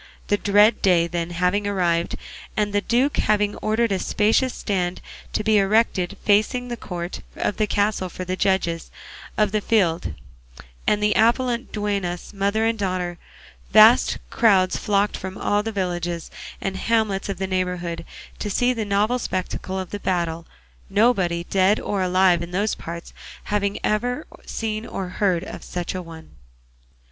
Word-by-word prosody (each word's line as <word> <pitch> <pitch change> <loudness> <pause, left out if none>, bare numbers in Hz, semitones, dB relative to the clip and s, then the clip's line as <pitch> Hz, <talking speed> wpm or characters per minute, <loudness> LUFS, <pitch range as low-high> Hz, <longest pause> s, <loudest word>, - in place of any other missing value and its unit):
The 205 - +3
dread 205 +2 +4
day, 175 -3 +4
then, 170 0 -3
having 180 +4 0
arrived, 175 -4 0 0.4
and 210 -1 0
the 205 - +2
duke 250 +7 +1
having 210 -1 +2
ordered 220 +1 0
a 190 - +1
spacious 225 +7 +2
stand 185 -3 -2 0.3
to - - 0
be 215 -1 +4
erected 200 -2 +1
facing 220 +4 +2
the 240 - -2
court 175 -5 -6
of 205 - -2
the 215 - +1
castle 200 -2 0
for 185 +1 -6
the 185 +1 -2
judges 185 -4 0 0.5
of 210 -2 +2
the 215 0 0
field 175 - +1 0.7
and 210 0 +2
the 210 0 +3
appellant 240 +2 +2
duennas, 200 -4 -3
mother 200 +3 +1
and 225 -1 0
daughter, 185 -3 -2 0.5
vast - - +7
crowds 190 -5 +4
flocked 205 0 +1
from 190 0 -6
all 205 0 +1
the 225 +1 -4
villages 175 -4 -3 0.3
and 190 -1 -3
hamlets 215 -3 0
of 195 - -3
the 190 - -2
neighbourhood 180 -2 -2 0.4
to 210 - -3
see 245 +5 +2
the 230 -3 -2
novel 210 +5 +1
spectacle 185 -2 -3
of 185 - -6
the 205 - -4
battle; 170 -4 -2 0.4
nobody, 195 -5 +2
dead 195 +3 +2
or 200 -2 -2
alive, 185 -1 +3
in 170 - -5
those 200 +4 0
parts 170 +1 -7 0.3
having 200 -1 -1
ever 245 +7 0 0.2
seen 220 -1 -3
or 190 -5 -5
heard 180 -2 0
of - - -8
such 175 -1 -4
a 185 - -3
one. 165 -2 -12
200 Hz, 160 wpm, -23 LUFS, 180-215 Hz, 0.7 s, vast